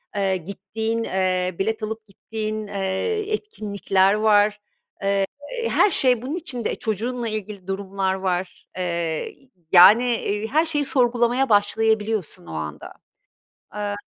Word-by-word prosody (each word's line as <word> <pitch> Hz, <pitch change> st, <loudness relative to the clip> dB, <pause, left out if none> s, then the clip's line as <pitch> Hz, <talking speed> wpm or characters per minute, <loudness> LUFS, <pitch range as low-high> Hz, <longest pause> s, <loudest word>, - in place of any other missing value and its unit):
eee, 195 Hz, -2 st, +1 dB
gittiğin, 205 Hz, +5 st, -4 dB
eee, 185 Hz, -2 st, 0 dB
bilet 220 Hz, +2 st, -1 dB
alıp 220 Hz, +1 st, -5 dB
gittiğin, 215 Hz, +1 st, -5 dB
eee, 200 Hz, -, -2 dB
etkinlikler 200 Hz, -, 0 dB
var. 210 Hz, -1 st, +3 dB, 0.4 s
Eee, 195 Hz, 0 st, +2 dB, 0.4 s
her 410 Hz, -, +4 dB
şey 250 Hz, -7 st, +4 dB
bunun 270 Hz, +6 st, -4 dB
içinde. 270 Hz, -10 st, -3 dB
E, -, -, -3 dB
çocuğunla 235 Hz, +3 st, -2 dB
ilgili 210 Hz, -3 st, -6 dB
durumlar 195 Hz, 0 st, -2 dB
var. 185 Hz, -1 st, -3 dB
Eee, 170 Hz, -3 st, -2 dB, 0.4 s
yani, 225 Hz, +7 st, +7 dB
iii, 210 Hz, +1 st, -2 dB
her 310 Hz, +7 st, +2 dB
şeyi 295 Hz, -3 st, 0 dB
sorgulamaya 245 Hz, 0 st, +2 dB
başlayabiliyorsun 210 Hz, -3 st, +1 dB
o -, -, -10 dB
anda. 75 Hz, -1 st, -6 dB, 0.8 s
Aaa 205 Hz, -1 st, -3 dB
210 Hz, 125 wpm, -23 LUFS, 190-230 Hz, 0.8 s, yani